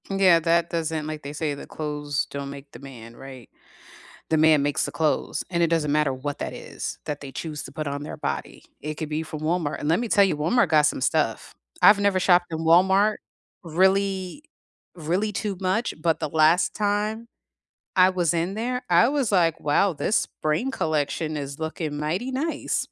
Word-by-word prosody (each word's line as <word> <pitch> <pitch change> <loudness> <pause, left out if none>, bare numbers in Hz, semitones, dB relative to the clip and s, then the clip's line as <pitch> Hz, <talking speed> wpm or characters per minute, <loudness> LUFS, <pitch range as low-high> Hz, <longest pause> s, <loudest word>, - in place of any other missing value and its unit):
Yeah, 190 -3 +4
that 170 +1 +1
doesn't 160 -2 -2
like, 155 -1 -5
they 145 0 -7
say 150 -1 -2
the 140 - -9
clothes 150 -2 -3
don't 140 0 -5
make 140 0 -10
the - - -12
man, 120 -4 -11
right? 130 -2 -11 0.8
The 160 - +3
man 155 -2 +5
makes 145 0 0
the - - -5
clothes, 155 -2 -1
and 170 -1 0
it - - +5
doesn't 160 -3 0
matter 150 -2 +2
what 145 +2 -5
that - - -4
is - - -7
that 150 -1 -4
they 140 -2 -9
choose 155 -1 -5
to 135 - -10
put 155 +2 -5
on 140 0 -3
their 150 - -7
body. - - -5 0.2
It 155 +2 -5
could 155 0 -5
be 155 +1 -2
from 155 -1 -7
Walmart, 160 -1 -1
and 150 - -2
let 165 +5 +2
me 240 - -3
tell 200 -1 +5
you, 190 -6 0
Walmart 200 +12 +2
got 155 -2 +4
some 150 - -1
stuff. 135 -4 -1 0.3
I've 205 0 +8
never 200 -2 +2
shopped 175 -1 +4
in 160 - -3
Walmart, 190 +6 +4 0.5
really 190 - +1 0.5
really 180 +6 -1
too 200 0 -3
much, 195 +5 0
but 165 -1 +1
the - - -3
last 160 +3 +3
time 210 +2 -1 0.7
I 185 0 +6
was 175 -3 +1
in 170 +3 -1
there, 250 +4 -2
I 175 +5 +5
was 275 -6 0
like, 165 -4 +3
"Wow, 165 +6 +2
this 170 +7 -2
spring 155 +13 -1
collection 155 - -2
is 140 -1 -5
looking 160 -2 -4
mighty 170 - -2
nice." 290 +5 -2
160 Hz, 195 wpm, -24 LUFS, 150-190 Hz, 0.8 s, I've